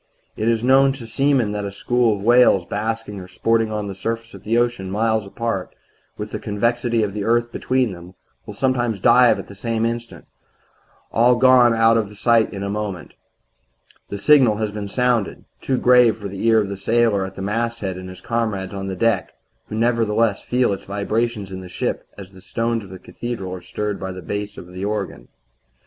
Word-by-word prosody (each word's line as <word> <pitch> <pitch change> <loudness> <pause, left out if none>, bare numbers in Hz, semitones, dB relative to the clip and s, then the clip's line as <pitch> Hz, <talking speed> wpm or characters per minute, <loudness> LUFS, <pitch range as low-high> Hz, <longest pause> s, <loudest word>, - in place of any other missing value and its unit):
"It 110 +2 0
is 115 -1 +1
known 135 +1 +5
to 130 -4 -9
seamen 135 -2 +1
that 105 0 -3
a 100 - -3
school 120 +2 +1
of 100 - -8
whales 120 -6 +5
basking 105 0 -3
or 90 - -9
sporting 115 +4 0
on 105 -1 -3
the 100 - -5
surface 115 +4 -4
of - - -11
the 115 +2 +1
ocean, 120 -6 0
miles 110 +1 0
apart, 105 -2 -4 0.4
with - - -6
the - - -4
convexity 115 +2 0
of 100 -2 -2
the 105 -1 -3
earth 120 +2 +1
between 130 -3 0
them, 90 +1 -11 0.3
will 105 - -8
sometimes 120 -3 0
dive 120 +1 +5
at - - -7
the - - -12
same 115 +2 -2
instant 115 0 -5 0.9
all 120 +2 +4
gone 125 -2 +5
out 115 0 +4
of 105 -2 -3
sight 115 0 +3
in 100 -1 -5
a - - -2
moment. 100 -4 -4 1.0
The 100 - -4
signal 130 -1 +5
has 110 -1 -2
been 105 -1 -5
sounded 120 -1 0 0.2
too 130 - 0
grave 125 -3 +5
for 105 -2 -6
the 100 +3 -3
ear 115 -1 +5
of 100 -2 -1
the 100 - -5
sailor 110 0 +2
at 95 0 -7
the 95 - -6
masthead 115 -2 -2
and 95 0 -8
his 95 - -11
comrades 110 -5 -2
on 95 0 -5
the 95 - -3
deck 100 -3 0 0.3
who - - -6
nevertheless 115 -2 +1
feel 125 -4 +1
its 95 - -7
vibrations 105 +1 -2
in 95 0 -6
the 90 - -10
ship - - -3
as 95 -2 -10
the 95 -1 -15
stones 115 +3 -2
of 95 - -12
a 95 - -8
cathedral 100 -2 -6
are 90 - -7
stirred 105 +2 -4
by 95 0 -4
the 90 -1 -8
bass 100 +5 -4
of - - -8
the 90 +1 -6
organ. 100 - -3
110 Hz, 205 wpm, -21 LUFS, 100-120 Hz, 1.0 s, known